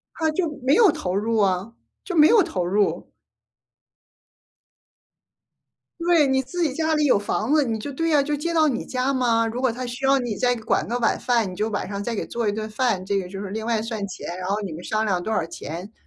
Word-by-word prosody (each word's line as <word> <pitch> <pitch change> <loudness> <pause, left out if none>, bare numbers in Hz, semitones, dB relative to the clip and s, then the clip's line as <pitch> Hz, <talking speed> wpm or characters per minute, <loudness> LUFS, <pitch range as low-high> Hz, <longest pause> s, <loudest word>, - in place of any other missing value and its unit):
它 320 -1 +1
就 335 +2 -1
没 265 +3 +3
有 430 -2 +6
投 180 -8 -3
入 225 +2 0
啊， 195 +2 0 0.3
就 365 - -5
没 305 0 +7
有 460 -3 +6
投 185 - -2
入。 200 +3 0 2.9
对， 335 -3 +4
你 265 0 +2
自 350 +7 -4
己 305 -5 +1
家 315 +1 0
里 300 -1 +2
有 265 -8 +4
房 210 +4 -1
子， 310 - +4
你 230 -5 -1
就 280 +7 -6
对 330 +5 -1
呀， 300 -3 +4
就 295 +1 -2
接 335 +4 -2
到 315 -1 +4
你 250 -5 -2
家 255 +1 -1
嘛。 235 -3 +2
如 230 +2 -3
果 260 -1 +2
他 250 +3 -5
需 245 +3 -3
要 275 0 +5
你 240 -4 -3
再 245 +4 +1
管 220 -1 -1
个 240 +2 -1
晚 235 - +1
饭， 235 -4 +1
你 - - -8
就 210 +4 -1
晚 205 -2 -3
上 200 +1 -4
再 235 +3 -3
给 210 - -3
做 235 -2 -2
一 - - +1
顿 215 +1 -4
饭， 215 -4 0
这 200 +1 0
个 180 - -7
就 195 +1 -8
是 200 - -6
另 220 +2 -4
外 230 -2 0
算 225 -1 -4
钱。 185 - -8
然 185 0 -4
后 200 +2 0
你 190 -5 -5
们 160 +3 -8
商 215 +3 -1
量 185 -4 0
多 220 - -4
少 220 - +1
钱， 190 - -7
230 Hz, 260 characters per minute, -23 LUFS, 205-275 Hz, 2.9 s, 没